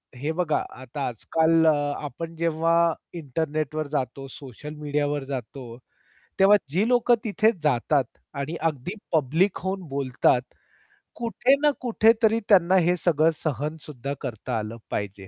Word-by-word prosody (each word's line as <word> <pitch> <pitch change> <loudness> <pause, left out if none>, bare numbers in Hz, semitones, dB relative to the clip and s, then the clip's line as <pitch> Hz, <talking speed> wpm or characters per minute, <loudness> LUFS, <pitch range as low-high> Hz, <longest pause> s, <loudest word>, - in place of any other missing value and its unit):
हे 145 +6 -2
बघा 160 -2 0 0.2
आता 135 +2 -4
आजकाल 160 +7 +2
अ, - - +7 0.3
आपण 165 +4 -6
जेव्हा 165 0 +2 0.2
इंटरनेटवर 155 0 -3
जातो 135 -1 -3
सोशल 140 +3 -9
मीडियावर 145 -1 -1
जातो. 130 -2 -7 0.6
तेव्हा 200 +2 +7
जी 190 +7 +1
लोकं 245 -1 +4
तिथे 215 +1 +3
जातात 140 0 +2 0.3
आणि 140 +4 -4
अगदी 150 +5 -5 0.2
पब्लिक 160 +6 +2
होऊन 190 +1 -3
बोलतात. 130 -2 +1 0.7
कुठे 235 +3 +2
ना 300 - +5
कुठेतरी 225 -1 +3
त्यांना 185 -2 +5
हे 180 -1 +4
सगळं 165 -2 +3
सहनसुद्धा 150 -2 -4
करता 120 -1 -4
आलं 110 +2 -6
पाहिजे. 100 -1 -4
155 Hz, 125 wpm, -25 LUFS, 135-175 Hz, 0.7 s, अ